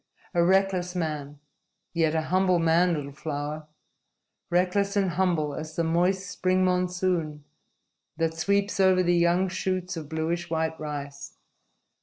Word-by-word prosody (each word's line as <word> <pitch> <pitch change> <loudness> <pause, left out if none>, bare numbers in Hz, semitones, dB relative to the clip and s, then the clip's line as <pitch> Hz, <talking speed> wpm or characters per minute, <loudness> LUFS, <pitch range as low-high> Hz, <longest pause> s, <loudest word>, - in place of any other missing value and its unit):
"A 170 -1 +3
reckless 185 -1 +2
man 150 -4 -3 0.6
yet 165 -2 +1
a 160 - +1
humble 185 +1 +2
man, 170 +1 +3
little 140 -2 -5
flower. 150 +1 -5 0.8
Reckless 185 +3 +1
and 195 -3 +2
humble 170 -5 0
as 155 +1 -7
the 170 - 0
moist 180 +4 +1
spring 185 0 +1
monsoon 180 -4 0 0.7
that 165 -1 0
sweeps 200 +5 0
over 185 -1 +4
the 175 0 +2
young 175 +2 +3
shoots 185 -1 -2
of 155 -3 -7
bluish 165 +2 -2
white 160 0 0
rice. 145 -2 -6
170 Hz, 135 wpm, -26 LUFS, 160-185 Hz, 0.8 s, over